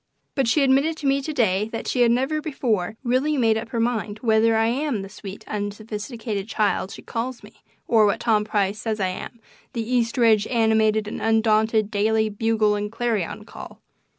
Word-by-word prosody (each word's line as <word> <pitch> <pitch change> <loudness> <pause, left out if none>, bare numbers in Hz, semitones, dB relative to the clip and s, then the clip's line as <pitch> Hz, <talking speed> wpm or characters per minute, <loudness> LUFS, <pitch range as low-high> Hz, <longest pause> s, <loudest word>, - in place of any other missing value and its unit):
But 270 -4 0
she 280 +5 +3
admitted 275 +4 +2
to 295 - -7
me 275 0 +2
to 310 - -4
day 215 -6 +1
that 225 - -5
she 250 - 0
had 240 - +5
never 265 +6 +1
before 225 - -2
really 265 +5 +1
made 225 -3 +3
up 220 +1 -4
her 230 - -2
mind 225 -3 -1
whether 225 0 +3
I 225 0 +3
am 245 -2 -1
the 195 - -9
"sweet, 200 0 -10
unsophisticated 210 +1 -4
child" 210 -4 0
she - - -10
calls 240 +2 -4
me, - - -16 0.3
or 220 -2 +5
what 200 - 0
Tom 220 -3 +2
Price 205 -1 -1
says 220 -1 -3
I 190 -1 +1
am, 230 +5 -7 0.3
The 230 -3 -3
Eastridge 230 -3 +2
Animated 220 -2 +2
and - - -5
Undaunted 220 -1 +2
Daily 220 +1 +1
Bugle 215 0 +1
and 210 0 -3
Clarion 215 -3 -2
Call. - - -11
225 Hz, 185 wpm, -23 LUFS, 210-240 Hz, 0.3 s, had